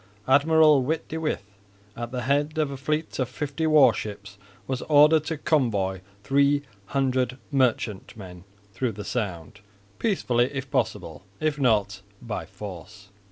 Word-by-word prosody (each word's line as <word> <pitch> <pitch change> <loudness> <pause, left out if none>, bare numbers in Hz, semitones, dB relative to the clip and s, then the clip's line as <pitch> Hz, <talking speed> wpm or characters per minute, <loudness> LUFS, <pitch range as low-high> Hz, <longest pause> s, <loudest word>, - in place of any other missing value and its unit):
Admiral 150 +1 +5
Witte 155 +5 -2
de 160 - -4
With 155 -9 -2 0.5
at 120 0 -5
the 125 -1 -3
head 145 +4 0
of 150 -3 0
a - - -5
fleet 150 +4 -2
of 130 -2 0
fifty 145 +4 -3
war 155 -3 +6
ships 100 -1 -7 0.3
was 130 -2 -3
ordered 150 +1 +6
to 160 +1 -3
convoy 105 - 0 0.2
300 130 -1 0
merchantmen 105 -8 -2 0.3
through 120 +3 -2
the 105 +1 -8
Sound, 95 -5 -4 0.4
peacefully 125 - +1
if 135 0 -5
possible, 100 - -2 0.2
if 155 -1 -1
not, 105 -6 +1 0.2
by 115 -3 -5
force. 100 +1 -10
130 Hz, 135 wpm, -25 LUFS, 105-145 Hz, 0.5 s, war